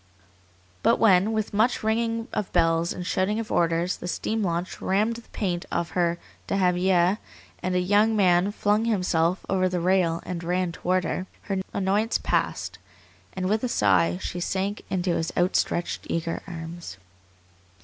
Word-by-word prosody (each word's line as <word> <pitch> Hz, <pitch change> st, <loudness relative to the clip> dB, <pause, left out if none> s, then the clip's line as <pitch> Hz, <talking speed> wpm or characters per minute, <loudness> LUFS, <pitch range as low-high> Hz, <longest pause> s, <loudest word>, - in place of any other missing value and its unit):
But -, -, +4 dB
when, 200 Hz, -1 st, +4 dB
with 215 Hz, -1 st, -2 dB
much 220 Hz, +4 st, +2 dB
ringing 225 Hz, +1 st, 0 dB
of 205 Hz, -, -2 dB
bells 165 Hz, 0 st, +2 dB
and 180 Hz, -, -5 dB
shouting 195 Hz, +4 st, 0 dB
of 225 Hz, -, -5 dB
orders, 170 Hz, +1 st, +1 dB
the -, -, -7 dB
steam 220 Hz, +5 st, -2 dB
launch 175 Hz, -1 st, -2 dB
rammed 215 Hz, +5 st, +1 dB
the 235 Hz, -, -14 dB
paint 175 Hz, -4 st, -3 dB
off 170 Hz, -, -1 dB
her 175 Hz, -1 st, +1 dB, 0.3 s
dahabiyeh, 180 Hz, 0 st, +2 dB, 0.4 s
and 185 Hz, 0 st, -1 dB
a -, -, +3 dB
young 205 Hz, +4 st, +3 dB
man 185 Hz, -1 st, +3 dB
flung 210 Hz, +1 st, +1 dB
himself 180 Hz, -5 st, +1 dB
over 185 Hz, -1 st, +1 dB
the 180 Hz, -1 st, -1 dB
rail 175 Hz, -2 st, +2 dB
and 175 Hz, -2 st, -4 dB
ran 180 Hz, +1 st, 0 dB
toward 180 Hz, +2 st, 0 dB
her, 185 Hz, +2 st, -3 dB, 0.2 s
her 195 Hz, -1 st, -2 dB
annoyance 200 Hz, +4 st, +1 dB
passed, -, -, -1 dB, 0.5 s
and 185 Hz, -1 st, -2 dB
with 215 Hz, +4 st, 0 dB
a 250 Hz, -, 0 dB
sigh 90 Hz, -, +3 dB
she 175 Hz, -, -4 dB
sank 195 Hz, +3 st, -2 dB
into 185 Hz, -1 st, 0 dB
his 165 Hz, 0 st, -1 dB
outstretched, 175 Hz, -1 st, 0 dB
eager 165 Hz, 0 st, -2 dB
arms. 165 Hz, -, -7 dB
185 Hz, 160 wpm, -25 LUFS, 175-205 Hz, 0.5 s, But